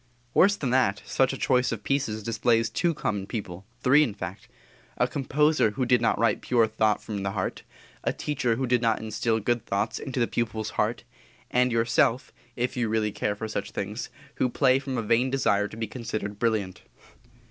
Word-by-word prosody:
Worse 200 +2 +5
than 135 -9 -2
that, 115 -7 +2
such 130 -1 +2
a 135 - -5
choice 125 -1 +2
of 110 -3 -4
pieces 115 -6 -1
displays 115 +1 +1
two 170 -2 0
common 100 -7 -2
people, 95 -4 -6 0.2
three, 140 +4 +6
in 115 -9 0
fact: 95 -2 -7 0.5
A - - +2
composer 150 -1 +2
who 130 - +1
did 120 -1 +3
not 115 - +2
write 115 -3 +2
pure 120 -2 +3
thought 110 -1 +1
from 105 -2 -4
the 100 0 -2
heart; 95 -3 -3 0.4
a - - +1
teacher 125 -6 -1
who 130 +3 -1
did 125 -1 +2
not 115 -2 +2
instil 110 +1 -1
good 120 +2 0
thoughts 100 +3 -1
into 135 -2 -4
the 120 - +3
pupil's 110 -2 -2
heart; 110 +1 -1 0.5
and 125 0 +3
yourself 115 +2 +1 0.2
(if 125 +1 -2
really 110 -3 0
you - - -10
care 105 -1 -1
for 110 +2 -5
such 105 -2 -4
things) 105 +4 -4 0.3
who 125 - +2
play 130 +1 +3
from 135 -2 -4
a 115 - -1
vain 115 +4 +2
desire 105 -6 +2
to 110 - -11
be 115 - -2
considered 110 -3 -5
brilliant. 105 -6 -1
115 Hz, 195 wpm, -26 LUFS, 105-125 Hz, 0.5 s, three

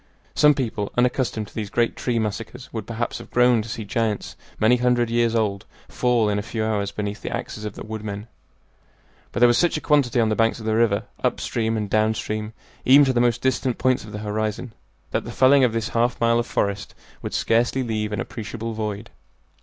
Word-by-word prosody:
Some 150 -1 +5
people 110 -6 -2
unaccustomed 120 -3 0
to - - -21
these 105 -3 -4
great 115 +1 +1
tree 125 -2 -1
massacres 115 +3 -4
would 110 -2 -5
perhaps 115 0 -3
have - - -11
groaned 125 -3 +3
to - - -9
see 110 0 -5
giants 110 -1 -2 0.2
many 115 +3 +4
hundred 120 -1 +1
years 115 -1 +2
old 105 -3 -1 0.2
fall 120 -3 +1
in 105 0 0
a - - -1
few 110 +1 -3
hours 100 -2 -1
beneath 105 0 -4
the - - -4
axes 105 - -5
of 105 - -5
the - - -7
woodmen; 105 -1 -5 1.1
but 120 - -3
there 120 - +8
was 120 0 +3
such 175 -3 +2
a - - -2
quantity 140 -6 +2
on 110 -1 +3
the 110 - +1
banks 115 +1 +1
of 110 - -8
the 110 0 +1
river, 110 -3 +2 0.2
up - - +1
stream 115 -1 -1
and 105 -1 -2
down 110 +2 +2
stream, 105 0 -4 0.3
even 140 +3 +7
to 130 - +1
the 120 - +2
most 120 -2 +2
distant 130 -1 0
points 130 0 +1
of 105 - -10
the 105 - -5
horizon, 110 +2 -3 0.4
that - - -1
the - - -7
felling 135 +1 +5
of 125 - +4
this 115 -1 -2
half 120 +1 0
mile 115 0 +3
of 120 - -2
forest 100 0 -2 0.3
would - - -4
scarcely 120 +3 +1
leave 110 -3 -2
an 105 - -2
appreciable 115 0 -5
void. 105 0 -4
115 Hz, 215 wpm, -23 LUFS, 105-120 Hz, 1.1 s, there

